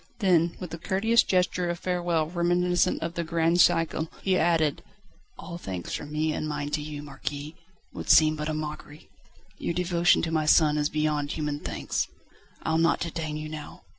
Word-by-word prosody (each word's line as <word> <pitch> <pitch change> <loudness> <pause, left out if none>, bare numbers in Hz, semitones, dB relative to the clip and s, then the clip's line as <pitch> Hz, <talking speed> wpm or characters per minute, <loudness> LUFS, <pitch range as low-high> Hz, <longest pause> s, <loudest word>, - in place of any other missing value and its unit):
Then 175 -5 +2
with 180 -3 -7
a 165 - -5
courteous 220 +7 +3
gesture 180 -1 +1
of 175 - -2
farewell 175 -3 0
reminiscent 175 +1 +1
of 165 0 -3
the 170 - -2
grand 165 +1 +1
siècle 165 -2 +3 0.2
he 190 -1 +2
added: 160 -4 +2 0.6
"All 170 -1 -8
thanks 95 - -5
from 145 - -5
me 155 +1 0
and 155 - -3
mine 145 -1 -3
to 150 - -1
you, 150 -1 -6
Marquis, 145 +1 -6 0.4
would - - -7
seem 155 0 +6
but 150 0 -3
a - - -1
mockery. 150 0 -7 0.5
Your 170 - -2
devotion 175 -1 +3
to 165 - -1
my 155 -1 0
son 150 -1 +5
is 150 0 +1
beyond 150 -2 -1
human 150 -2 -3
thanks. - - -2 0.6
I'll 160 0 +1
not 165 +1 +3
detain 160 -2 -3
you 155 0 -5
now. 155 -1 -9
160 Hz, 180 wpm, -27 LUFS, 150-175 Hz, 0.6 s, seem